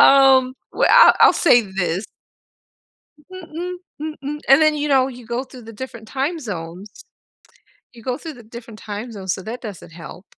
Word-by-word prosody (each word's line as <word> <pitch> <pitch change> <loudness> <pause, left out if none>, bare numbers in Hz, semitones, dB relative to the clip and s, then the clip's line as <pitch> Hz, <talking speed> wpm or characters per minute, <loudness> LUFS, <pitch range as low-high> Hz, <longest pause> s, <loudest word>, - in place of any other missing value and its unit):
Um, 265 -2 +6 0.2
well, - - +2
I - - +8
I'll - - +8
say 245 -8 +5
this 190 -2 -3 1.3
Mm-mm, 360 0 -7 0.3
mm-mm, 300 -1 -5
and 270 +3 +6
then, 310 -1 +4
you 295 0 -2
know, 265 -2 +3
you 250 -2 -10
go 235 +3 -3
through 255 -2 -14
the 225 0 -11
different 230 -1 -9
time 280 +7 -2
zones. 185 - -8 0.9
You 230 -2 -15
go 255 0 -2
through 320 0 -8
the 240 -3 -14
different 230 -1 -11
time 210 +3 -7
zones, 190 -4 -3
so 190 - -6
that 235 +3 -7
doesn't 195 -7 -9
help. 175 +3 -11
245 Hz, 175 wpm, -20 LUFS, 210-280 Hz, 1.3 s, I